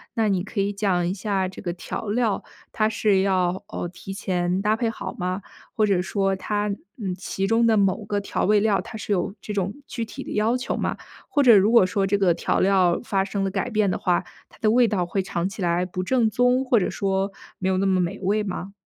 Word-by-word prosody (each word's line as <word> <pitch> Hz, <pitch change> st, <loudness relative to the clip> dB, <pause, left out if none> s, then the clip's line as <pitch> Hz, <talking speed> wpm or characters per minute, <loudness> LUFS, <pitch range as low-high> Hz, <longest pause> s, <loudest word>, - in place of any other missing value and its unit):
那 225 Hz, -2 st, +2 dB
你 185 Hz, -2 st, +1 dB
可 210 Hz, -, -5 dB
以 200 Hz, +1 st, 0 dB
讲 185 Hz, -4 st, +1 dB
一 185 Hz, -, -1 dB
下 195 Hz, -1 st, -1 dB
这 185 Hz, -, -9 dB
个 175 Hz, -, -3 dB
调 180 Hz, +4 st, -6 dB
料 220 Hz, -1 st, 0 dB, 0.3 s
它 215 Hz, 0 st, +1 dB
是 210 Hz, -3 st, +2 dB
要， 185 Hz, -1 st, +1 dB
呃， 175 Hz, -, -4 dB
提 185 Hz, +2 st, -9 dB
前 180 Hz, -1 st, -1 dB
搭 215 Hz, +1 st, +3 dB
配 230 Hz, 0 st, 0 dB
好 190 Hz, -4 st, -6 dB
吗？ 185 Hz, +2 st, -3 dB, 0.3 s
或 215 Hz, -, +3 dB
者 190 Hz, -3 st, +2 dB
说 195 Hz, 0 st, 0 dB
它 205 Hz, +2 st, -2 dB, 0.3 s
嗯， 195 Hz, -6 st, -3 dB
其 195 Hz, +1 st, -3 dB
中 230 Hz, +3 st, +3 dB
的 220 Hz, -1 st, +4 dB
某 195 Hz, +1 st, +2 dB
个 205 Hz, -1 st, -1 dB
调 200 Hz, -, -2 dB
味 210 Hz, +1 st, +4 dB
料， 200 Hz, -3 st, +2 dB
它 220 Hz, -, -8 dB
是 210 Hz, -1 st, -2 dB
有 185 Hz, +1 st, -1 dB
这 210 Hz, -, -5 dB
种 195 Hz, -1 st, -1 dB, 0.2 s
具 235 Hz, -4 st, -4 dB
体 -, -, -8 dB
的 -, -, -8 dB
要 225 Hz, +4 st, +2 dB
求 250 Hz, -, -3 dB
吗？ -, -, -2 dB, 0.3 s
或 285 Hz, -1 st, +2 dB
者 235 Hz, -4 st, +8 dB
如 200 Hz, +3 st, +5 dB
果 230 Hz, -6 st, +6 dB
说 195 Hz, +1 st, 0 dB
这 200 Hz, +1 st, +2 dB
个 185 Hz, -4 st, +3 dB
调 -, -, 0 dB
料 185 Hz, -2 st, +3 dB
发 195 Hz, -4 st, 0 dB
生 195 Hz, 0 st, -2 dB
了 195 Hz, -, -1 dB
改 195 Hz, -2 st, -2 dB
变 210 Hz, -3 st, +1 dB
的 -, -, -1 dB
话， 180 Hz, -1 st, +1 dB, 0.3 s
它 -, -, -20 dB
的 215 Hz, -1 st, +3 dB
味 240 Hz, 0 st, +5 dB
道 185 Hz, -5 st, 0 dB
会 190 Hz, +3 st, -1 dB
尝 175 Hz, -1 st, -2 dB
起 195 Hz, +1 st, -7 dB
来 175 Hz, +1 st, +1 dB
不 185 Hz, 0 st, -4 dB
正 230 Hz, +2 st, +2 dB
宗， 250 Hz, +3 st, +2 dB
或 245 Hz, -4 st, +4 dB
者 180 Hz, -, 0 dB
说 195 Hz, 0 st, -1 dB, 0.3 s
没 190 Hz, 0 st, 0 dB
有 185 Hz, -, +1 dB
那 195 Hz, -, +1 dB
么 190 Hz, -1 st, +2 dB
美 180 Hz, +3 st, -2 dB
味 205 Hz, +3 st, +1 dB
吗？ 195 Hz, -1 st, -5 dB
195 Hz, 260 characters per minute, -24 LUFS, 185-215 Hz, 0.3 s, 者